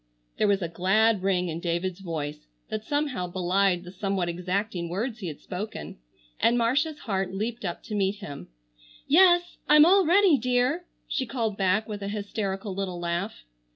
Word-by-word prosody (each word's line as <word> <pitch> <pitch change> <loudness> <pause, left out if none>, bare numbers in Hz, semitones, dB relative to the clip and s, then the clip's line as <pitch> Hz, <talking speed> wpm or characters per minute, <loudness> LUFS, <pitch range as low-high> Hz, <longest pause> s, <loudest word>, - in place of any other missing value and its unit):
There - - +3
was 200 -2 +2
a - - -1
glad 195 +5 +2
ring 185 -2 +1
in 165 0 -4
David's 175 +2 -2
voice 150 -4 -5 0.2
that 215 -1 -3
somehow 285 -7 -1
belied 180 0 +1
the 180 - -9
somewhat 190 -2 -1
exacting 180 +1 -2
words 225 +7 -3
he 190 - -5
had 150 -3 -6
spoken, 205 - -6 0.4
and 235 +1 +3
Marcia's 280 +7 +1
heart 195 -4 -2
leaped 225 +4 -3
up 175 -3 -4
to 215 - -7
meet 200 -1 +1
him. 145 - -8 0.6
"Yes, 350 +2 +5
I'm 300 0 +8
all 385 +3 +6
ready, 360 -4 +5
dear!" 250 +8 +1 0.2
she 260 - -2
called 225 -5 -2
back 195 +2 +1
with 210 -2 -5
a 200 - -3
hysterical 200 -1 -3
little 185 -2 -3
laugh. 175 +4 -3
200 Hz, 170 wpm, -27 LUFS, 180-235 Hz, 0.6 s, I'm